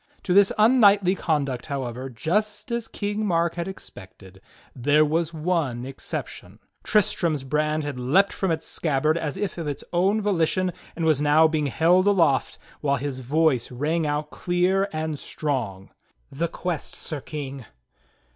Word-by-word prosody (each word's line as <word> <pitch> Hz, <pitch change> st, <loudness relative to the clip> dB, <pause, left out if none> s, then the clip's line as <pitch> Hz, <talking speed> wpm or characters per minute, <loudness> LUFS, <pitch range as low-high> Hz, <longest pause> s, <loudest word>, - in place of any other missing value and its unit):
To 180 Hz, -, 0 dB
this 200 Hz, 0 st, +6 dB
unknightly 210 Hz, -5 st, +5 dB
con 155 Hz, -6 st, 0 dB
duct, 130 Hz, -3 st, -5 dB
however, 130 Hz, -2 st, -4 dB
just 205 Hz, -, -2 dB
as 235 Hz, -1 st, -2 dB
King 205 Hz, +1 st, -3 dB
Mark 170 Hz, -4 st, +1 dB
had 170 Hz, 0 st, -4 dB
expected, 95 Hz, -, -12 dB, 0.3 s
there 145 Hz, +4 st, +3 dB
was 160 Hz, +2 st, 0 dB
one 155 Hz, -7 st, -1 dB
ex 135 Hz, 0 st, -9 dB
ception -, -, -6 dB
— -, -, -42 dB
Tristram's 170 Hz, -, +1 dB
brand 150 Hz, +3 st, 0 dB
had 145 Hz, -3 st, -5 dB
leaped 165 Hz, +11 st, +3 dB
from 190 Hz, -, -1 dB
its 160 Hz, -1 st, -1 dB
scabbard 155 Hz, 0 st, 0 dB
as 155 Hz, -2 st, -3 dB
if 195 Hz, -3 st, -3 dB
of 165 Hz, -, -4 dB
its 145 Hz, -, -4 dB
own 190 Hz, +5 st, +2 dB
volition 185 Hz, -2 st, 0 dB, 0.2 s
and 165 Hz, -, -2 dB
was 155 Hz, -3 st, +3 dB
now 150 Hz, +2 st, +5 dB
being 155 Hz, -2 st, 0 dB
held 175 Hz, +7 st, +3 dB
aloft, 165 Hz, -9 st, +2 dB, 0.2 s
while 140 Hz, -1 st, +1 dB
his 135 Hz, 0 st, -4 dB
voice 135 Hz, -1 st, +1 dB
rang 155 Hz, +5 st, -1 dB
out 150 Hz, +1 st, -2 dB
clear 185 Hz, +3 st, +1 dB
and 155 Hz, -2 st, -3 dB
strong: 115 Hz, -11 st, -4 dB, 0.4 s
"The 165 Hz, +5 st, -1 dB
quest. 170 Hz, -1 st, -4 dB
Sir 155 Hz, -3 st, -6 dB
King!" 135 Hz, -5 st, -7 dB
155 Hz, 160 wpm, -24 LUFS, 140-180 Hz, 0.4 s, this